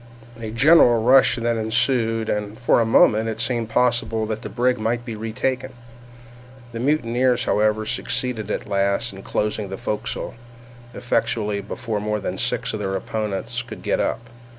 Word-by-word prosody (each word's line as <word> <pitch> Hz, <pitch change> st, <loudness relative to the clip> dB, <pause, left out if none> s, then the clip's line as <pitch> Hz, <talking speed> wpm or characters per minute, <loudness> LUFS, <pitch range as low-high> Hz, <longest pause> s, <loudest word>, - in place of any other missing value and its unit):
A 110 Hz, -1 st, -5 dB
general 120 Hz, -1 st, +5 dB
rush 130 Hz, 0 st, +5 dB
then 115 Hz, -1 st, -1 dB
ensued, 115 Hz, 0 st, +1 dB
and 105 Hz, +1 st, -3 dB
for 120 Hz, -, +3 dB
a -, -, +2 dB
moment 110 Hz, 0 st, +4 dB
it 110 Hz, -1 st, -5 dB
seemed 115 Hz, -3 st, -1 dB
possible 120 Hz, -2 st, +1 dB
that 110 Hz, 0 st, -4 dB
the -, -, -6 dB
brig 125 Hz, +1 st, +1 dB
might 120 Hz, +2 st, -1 dB
be 115 Hz, -, -5 dB
retaken. 125 Hz, +4 st, -3 dB, 1.0 s
The 115 Hz, -, -6 dB
mutineers, 125 Hz, -2 st, +1 dB
however, 110 Hz, +1 st, +1 dB
succeeded 110 Hz, -1 st, -2 dB
at -, -, -3 dB
last 100 Hz, -1 st, 0 dB
in 95 Hz, -, -10 dB
closing 105 Hz, 0 st, -2 dB
the 95 Hz, -, -5 dB
forecastle 105 Hz, +5 st, -4 dB, 0.6 s
effectually 105 Hz, -4 st, -1 dB
before 105 Hz, +2 st, -4 dB
more 105 Hz, +1 st, -2 dB
than 100 Hz, -, -4 dB
six -, -, -1 dB
of -, -, -3 dB
their 95 Hz, 0 st, -2 dB
opponents 110 Hz, +4 st, -3 dB
could 120 Hz, -2 st, -10 dB
get -, -, 0 dB
up. 120 Hz, -, -2 dB
115 Hz, 160 wpm, -22 LUFS, 105-120 Hz, 1.0 s, general